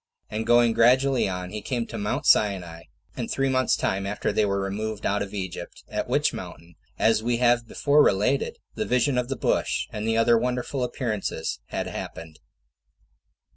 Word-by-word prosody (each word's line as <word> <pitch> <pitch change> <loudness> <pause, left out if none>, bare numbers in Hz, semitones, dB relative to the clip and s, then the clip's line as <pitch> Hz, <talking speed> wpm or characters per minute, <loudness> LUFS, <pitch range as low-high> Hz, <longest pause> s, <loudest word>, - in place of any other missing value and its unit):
And 110 +1 -3
going 120 -1 +5
gradually 125 +1 +4
on, 90 -1 -5
he 105 - -5
came 120 +2 -2
to - - -7
Mount 105 0 -2
Sinai, 90 -5 +2 0.3
in - - -3
three 135 0 0
months' 130 0 +2
time 95 +1 -1
after 105 +1 -1
they 105 - +2
were 100 -1 0
removed 105 +2 -3
out 100 +1 +1
of 100 -1 -4
Egypt; 95 -4 -6
at - - -3
which - - +2
mountain, 85 +2 -9 0.2
as 110 -1 +3
we 120 +1 0
have 120 -1 +3
before 145 +5 +3
related, 105 +8 +1 0.2
the - - -3
vision 125 +2 +2
of 125 0 -3
the 135 - -1
bush, - - 0
and 105 +1 -4
the 115 0 +1
other 115 0 +4
wonderful 125 +2 -2
appearances, 110 - -3
had - - -3
happened. 80 -2 -7
110 Hz, 175 wpm, -25 LUFS, 100-125 Hz, 0.3 s, going